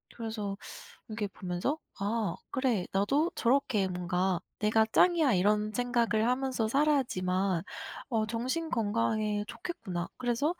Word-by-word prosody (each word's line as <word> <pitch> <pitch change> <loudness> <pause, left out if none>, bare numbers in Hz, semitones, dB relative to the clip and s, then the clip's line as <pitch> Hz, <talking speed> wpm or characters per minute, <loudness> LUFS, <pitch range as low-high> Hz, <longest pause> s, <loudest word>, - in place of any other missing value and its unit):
그래서 220 -4 -3 0.5
이렇게 215 -1 -3
보면서 190 - -3 0.2
아 205 -2 0 0.2
그래. 250 -9 +1
나도 275 - +2
저렇게 235 -5 +2
뭔가 180 0 0 0.2
'내가 220 +1 +4
짱이야.' 335 -8 +5
이런 210 +3 +2
생각을 235 -2 +1
하면서 255 -3 0
살아야지만 195 - +1 0.5
어 220 -3 +1
정신건강에 230 -5 0
좋겠구나. 190 - -5
그래서 255 +7 0
좀 - - -34
220 Hz, 290 characters per minute, -30 LUFS, 200-255 Hz, 0.5 s, 짱이야